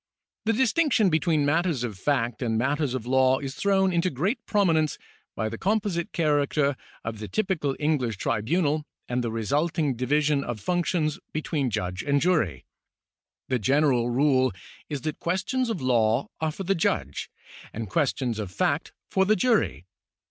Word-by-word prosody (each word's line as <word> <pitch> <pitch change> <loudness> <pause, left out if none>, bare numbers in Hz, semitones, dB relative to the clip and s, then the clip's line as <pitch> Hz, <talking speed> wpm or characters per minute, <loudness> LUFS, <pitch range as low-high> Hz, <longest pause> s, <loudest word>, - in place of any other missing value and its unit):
The 225 - +3
distinction 245 - +3
between 155 -2 +2
matters 160 -3 +1
of 115 -4 -3
fact 120 +2 -1
and 115 -3 0
matters 140 +2 0
of 125 -3 -4
law 130 +1 +4
is 135 -1 -5
thrown 190 0 +2
into 170 +2 +2
great 180 - -1
prominence 165 -8 +2 0.4
by 110 - -1
the - - -6
composite 200 -4 0
character 145 -3 +1 0.3
of 110 -1 -5
the 105 - -5
typical 175 - -1
English 140 -8 0
tribunal 145 - 0 0.2
and 125 0 -1
the 120 - -1
resulting 145 - 0
division 145 +3 +1
of 120 -4 -4
functions 170 - 0
between 150 -3 -1
judge 90 -3 -2
and 140 0 +1
jury. 125 - +1 0.8
The 130 -1 0
general 130 +1 +2
rule 130 0 +3 0.4
is 145 -3 -3
that 155 +3 -4
questions 210 +9 -1
of 190 -11 -3
law 120 0 +2
are 160 -1 0
for 195 - -6
the 195 +2 +2
judge 70 - -1 0.4
and 110 0 -5
questions 125 0 0
of 105 -4 -4
fact - - 0
for 190 - +2
the 215 +2 +4
jury. 210 - +1
145 Hz, 155 wpm, -26 LUFS, 120-170 Hz, 0.8 s, law